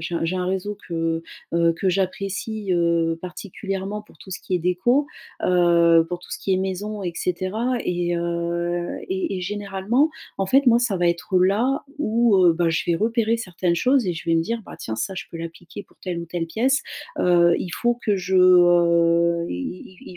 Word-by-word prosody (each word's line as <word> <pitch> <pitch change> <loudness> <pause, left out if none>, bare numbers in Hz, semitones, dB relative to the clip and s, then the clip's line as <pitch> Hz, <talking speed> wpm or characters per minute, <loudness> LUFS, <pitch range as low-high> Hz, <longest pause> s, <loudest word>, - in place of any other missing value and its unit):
j'ai 170 +1 -3
j'ai 165 +3 -1
un 180 0 -2
réseau 190 +2 -2
que, 165 -1 -1 0.3
heu, 170 0 +3
que 190 +3 -1
j'apprécie, 195 +2 -2
heu 170 -1 +1
particulièrement 195 +2 -5
pour - - -22
tout 190 - -13
ce - - -5
qui 185 - -3
est - - +2
déco, 190 - +1 0.4
heu, 170 -2 +4
pour 175 0 -4
tout - - -15
ce - - -4
qui 195 - -1
est - - +2
maison, 195 +2 -3
et 175 -2 -3
cetera. 185 +8 -1
Et 175 -1 -1
heu 170 0 -2
et 370 - -2
et - - -4
généralement, 205 - 0 0.3
en 195 - 0
fait, 270 +6 +3
moi, 235 -1 +6
ça 235 -5 0
va 175 0 +1
être 170 +2 0
là 220 +9 +2
où, 230 -5 +3
heu, 175 -2 +6
bah, 170 -1 +1
je 165 - 0
vais 170 - +2
repérer 230 +2 +1
certaines 180 -4 -1
choses 255 +1 +2
et 180 - +1
je 165 - -7
vais 165 - +4
me 165 - +3
dire: 230 +5 -3
«Bah - - -10
tiens, 110 - -5
ça 190 - -3
je - - -5
peux 165 - -7
l'appliquer 165 +3 -8
pour - - -28
telle 180 -2 -4
ou 170 - -5
telle 170 0 -3
pièce.» 255 +10 +1 0.4
Heu, 175 -1 +4
il 180 - -4
faut 240 +5 +1
que 210 -4 -1
je, 185 +1 -1
heu, 170 -2 +4
i - - -4
i 180 - -7
i - - -9
i - - -12
180 Hz, 210 wpm, -23 LUFS, 170-205 Hz, 0.4 s, moi